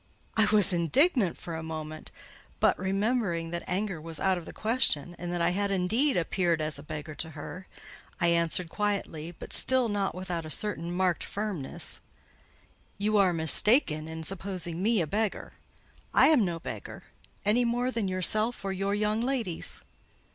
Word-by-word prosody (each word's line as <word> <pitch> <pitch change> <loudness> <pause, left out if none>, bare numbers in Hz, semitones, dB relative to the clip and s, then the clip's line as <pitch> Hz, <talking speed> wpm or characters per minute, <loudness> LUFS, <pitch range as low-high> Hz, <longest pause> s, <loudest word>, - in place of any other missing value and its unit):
I 220 - +6
was 205 -2 +5
indignant 195 - +2
for 170 -2 -6
a 160 - -4
moment; 155 -1 -6 0.5
but - - +4
remembering 190 -3 0
that 170 0 -2
anger 185 -3 -2
was 160 -1 -5
out 190 -1 +2
of 175 -2 -6
the - - -8
question, 215 - +2
and 175 0 -4
that 175 -1 -1
I 170 - +3
had 200 +2 0
indeed 215 +9 +2
appeared 170 -1 +1
as 155 -2 -2
a - - -8
beggar 150 0 -7
to 160 +2 -5
her, 185 +5 -8 0.5
I 170 -2 +3
answered 170 +1 +1
quietly, 175 -4 -3
but - - -8
still 260 -2 +3
not 200 -3 -1
without 180 -2 -4
a 155 - -8
certain 175 -2 -3
marked 180 -1 +1
firmness— 200 -9 -4 1.0
"You 210 +2 +1
are 195 -3 +5
mistaken 160 - +3
in 160 0 -6
supposing 180 -1 -2
me 220 0 +2
a - - 0
beggar. 210 +6 -2 0.6
I - - +7
am 295 -8 +5
no 175 -3 -1
beggar; - - -7 0.4
any 220 +4 +3
more 245 +2 0
than 230 -5 -1
yourself 215 +5 +1
or 195 - -1
your 195 +2 -1
young 210 +1 0
ladies." 240 -9 -3
185 Hz, 170 wpm, -28 LUFS, 165-210 Hz, 1.0 s, I